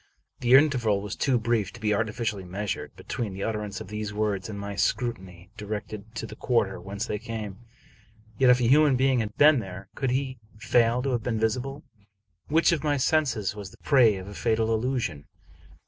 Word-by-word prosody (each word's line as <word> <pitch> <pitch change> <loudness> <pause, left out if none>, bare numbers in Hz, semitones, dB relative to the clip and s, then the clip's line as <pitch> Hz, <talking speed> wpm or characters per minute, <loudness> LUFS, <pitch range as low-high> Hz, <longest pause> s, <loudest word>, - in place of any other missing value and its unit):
The 125 +1 +5
interval 125 -8 +4
was 100 -1 -5
too 130 -3 +2
brief 115 -3 0
to 120 - -11
be 105 -1 +1
artificially 110 -1 -2
measured, 100 +3 -4
be - - -13
tween 110 -5 -4
the 100 - -4
utterance 105 -2 -3
of - - -9
these 105 0 -4
words 105 -2 -1
and 100 -2 -6
my 100 0 -5
scrutiny 95 -6 -2
directed 105 +1 -6
to 115 - -4
the 110 - -9
quarter 110 -7 0
whence 100 +3 -4
they 105 - -3
came. 105 -3 -6 0.8
Yet, 130 -1 +5
if 125 0 +6
a - - 0
human 140 +3 +5
being 130 0 +3
had 105 -2 -4
been 150 -2 +6
there, 95 -2 -8
could 135 - -1
he 130 0 -2 0.2
fail 120 +2 +2
to 135 - 0
have 120 -2 0
been 115 0 -2
visible? 130 +6 -1 0.6
Which 160 +3 +4
of 165 -3 0
my 145 -2 +1
senses 130 - +1
was 100 -2 -7
the - - -17
prey 120 -7 +5
of 95 0 -7
a 100 - -8
fatal 115 0 +1
illusion? 110 - -2
110 Hz, 195 wpm, -26 LUFS, 100-125 Hz, 0.8 s, if